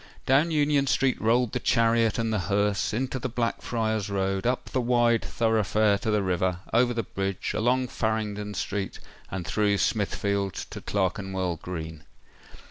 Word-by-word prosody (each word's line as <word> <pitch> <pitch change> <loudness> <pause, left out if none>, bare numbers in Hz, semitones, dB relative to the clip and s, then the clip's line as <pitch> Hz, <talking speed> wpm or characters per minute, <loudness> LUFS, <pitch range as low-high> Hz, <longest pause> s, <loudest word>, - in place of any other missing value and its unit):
Down 140 +6 +4
Union 145 -3 +2
Street 135 -1 +1
rolled 120 +1 +2
the - - -1
chariot 115 -1 +2
and 115 -1 0
the 105 - +1
hearse—into 105 +6 0
the 130 - -3
Blackfriars 115 -3 -1
Road—up 95 +5 -1
the 130 - +1
wide 120 -1 +3
thoroughfare 110 -2 +2
to 110 - -3
the 105 -2 +2
river—over 95 +6 +1
the 115 -1 -1
bridge—along 110 +7 -1
Farringdon 105 -2 -2
Street—and 95 -1 -5
through 100 +4 +1
Smithfield 100 -2 0 0.2
to - - -7
Clerkenwell 95 -2 -1
Green. 80 -2 -7
110 Hz, 130 wpm, -26 LUFS, 95-120 Hz, 0.2 s, Down